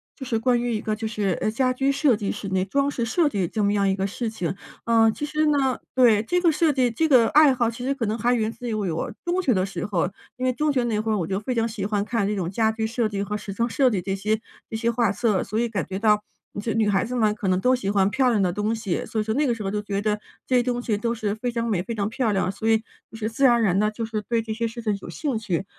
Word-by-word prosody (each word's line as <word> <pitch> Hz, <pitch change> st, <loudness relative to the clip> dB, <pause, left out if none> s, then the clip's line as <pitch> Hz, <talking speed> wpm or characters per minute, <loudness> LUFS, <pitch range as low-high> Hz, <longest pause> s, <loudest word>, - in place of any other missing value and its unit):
就 265 Hz, -, -8 dB
是 230 Hz, -3 st, 0 dB
关 245 Hz, +1 st, +2 dB
于 240 Hz, -1 st, -1 dB
一 215 Hz, -, -2 dB
个 215 Hz, -, -1 dB
就 220 Hz, 0 st, -4 dB
是 205 Hz, -5 st, -1 dB
呃， 215 Hz, -, 0 dB
家 255 Hz, +3 st, +1 dB
居 270 Hz, +2 st, +1 dB
设 275 Hz, -3 st, +3 dB
计、 205 Hz, -2 st, -2 dB
室 205 Hz, -1 st, -6 dB
内 185 Hz, 0 st, 0 dB
装 280 Hz, +7 st, +1 dB
饰 235 Hz, -4 st, -2 dB
设 300 Hz, +6 st, +2 dB
计 195 Hz, -9 st, -1 dB
这 215 Hz, +2 st, -2 dB
么 200 Hz, +1 st, +2 dB
样 200 Hz, -1 st, +2 dB
一 190 Hz, -, +2 dB
个 195 Hz, 0 st, -1 dB
事 230 Hz, +4 st, -4 dB
情。 190 Hz, -5 st, -3 dB, 0.3 s
呃， 225 Hz, -1 st, +4 dB
其 255 Hz, -, -7 dB
实 305 Hz, +1 st, 0 dB
呢 275 Hz, -4 st, +2 dB, 0.2 s
对， 230 Hz, -5 st, +5 dB
这 355 Hz, +10 st, 0 dB
个 340 Hz, -2 st, +4 dB
设 315 Hz, 0 st, +2 dB
计 255 Hz, -2 st, +2 dB
这 280 Hz, +8 st, 0 dB
个 250 Hz, -6 st, +5 dB
爱 295 Hz, 0 st, +6 dB
好， 240 Hz, -2 st, +1 dB
其 235 Hz, +2 st, -6 dB
实 275 Hz, -, +1 dB
可 235 Hz, -5 st, -2 dB
能 215 Hz, +2 st, -1 dB
还 240 Hz, +2 st, +2 dB
源 220 Hz, -2 st, 0 dB
自 245 Hz, +1 st, -8 dB
于 230 Hz, -, -2 dB
我 190 Hz, -7 st, -2 dB
中 350 Hz, +1 st, 0 dB
学 260 Hz, -, +3 dB
的 185 Hz, -3 st, +1 dB
时 185 Hz, -3 st, -4 dB
候， 185 Hz, -3 st, 0 dB, 0.3 s
因 255 Hz, -, -2 dB
为 -, -, +3 dB
中 300 Hz, +3 st, 0 dB
学 255 Hz, -3 st, +1 dB
那 220 Hz, -3 st, 0 dB
会 220 Hz, +1 st, -1 dB
儿 215 Hz, -, +1 dB
我 165 Hz, -, -2 dB
就 190 Hz, 0 st, -1 dB
非 235 Hz, +5 st, -3 dB
常 230 Hz, -1 st, +1 dB
喜 215 Hz, -4 st, -4 dB
欢 205 Hz, -1 st, 0 dB
看 215 Hz, -2 st, -1 dB
这 210 Hz, -, -1 dB
种 180 Hz, -4 st, -2 dB
家 220 Hz, +3 st, +1 dB
居 220 Hz, 0 st, -2 dB
设 230 Hz, 0 st, 0 dB
计 200 Hz, -2 st, -3 dB
和 210 Hz, +1 st, -2 dB
时 200 Hz, -1 st, -7 dB
装 235 Hz, +4 st, 0 dB
设 260 Hz, +1 st, +3 dB
计 195 Hz, -4 st, -1 dB
这 195 Hz, +2 st, -2 dB
些 215 Hz, +3 st, -1 dB, 0.3 s
这 -, -, -6 dB
些 230 Hz, +1 st, 0 dB
画 235 Hz, -3 st, +2 dB
册。 205 Hz, -1 st, +1 dB
所 215 Hz, +3 st, -2 dB
以 235 Hz, -, 0 dB
感 205 Hz, -4 st, -2 dB
觉 190 Hz, 0 st, -5 dB
到 210 Hz, -1 st, +3 dB, 0.4 s
这 225 Hz, -, -2 dB
女 220 Hz, -2 st, +2 dB
孩 200 Hz, -2 st, +2 dB
子 245 Hz, +2 st, -4 dB
嘛， 215 Hz, -3 st, +2 dB
可 210 Hz, -2 st, -4 dB
能 185 Hz, 0 st, +2 dB
都 255 Hz, +5 st, +3 dB
喜 220 Hz, -6 st, -3 dB
欢 200 Hz, -1 st, +3 dB
漂 260 Hz, +1 st, +3 dB
亮 225 Hz, -4 st, +2 dB
的 180 Hz, -2 st, +1 dB
东 210 Hz, +3 st, -1 dB
西， 210 Hz, -6 st, -2 dB
所 220 Hz, -, -2 dB
以 -, -, +1 dB
说 220 Hz, 0 st, -1 dB
那 290 Hz, +5 st, +1 dB
个 240 Hz, -, +1 dB
时 215 Hz, -, -6 dB
候 195 Hz, -, -2 dB
就 210 Hz, 0 st, -1 dB
觉 200 Hz, -1 st, -3 dB
得， 210 Hz, 0 st, 0 dB, 0.3 s
这 255 Hz, -, +1 dB
些 -, -, +4 dB
东 245 Hz, 0 st, -1 dB
西 230 Hz, -3 st, -1 dB
都 230 Hz, +3 st, -1 dB
是 215 Hz, -3 st, -2 dB
非 240 Hz, +3 st, -3 dB
常 235 Hz, 0 st, -2 dB
美、 200 Hz, -6 st, 0 dB
非 230 Hz, +5 st, -5 dB
常 200 Hz, -1 st, -1 dB
漂 225 Hz, 0 st, 0 dB
亮， 190 Hz, -1 st, 0 dB
所 220 Hz, +3 st, -2 dB
以 225 Hz, -, +5 dB, 0.3 s
就 225 Hz, -, -10 dB
是 220 Hz, -1 st, -2 dB
自 230 Hz, +5 st, -3 dB
然 255 Hz, -3 st, +7 dB
而 235 Hz, -, +2 dB
然 195 Hz, -2 st, +2 dB
的， 210 Hz, +1 st, +3 dB
就 225 Hz, +1 st, -4 dB
是 220 Hz, -1 st, -3 dB
对 235 Hz, -1 st, +2 dB
这 220 Hz, -1 st, -4 dB
些 230 Hz, +1 st, -1 dB
事 230 Hz, +1 st, -8 dB
情 210 Hz, -2 st, +1 dB
有 -, -, -9 dB
兴 275 Hz, -7 st, -2 dB
趣。 190 Hz, -4 st, -2 dB
220 Hz, 340 characters per minute, -24 LUFS, 205-245 Hz, 0.4 s, 然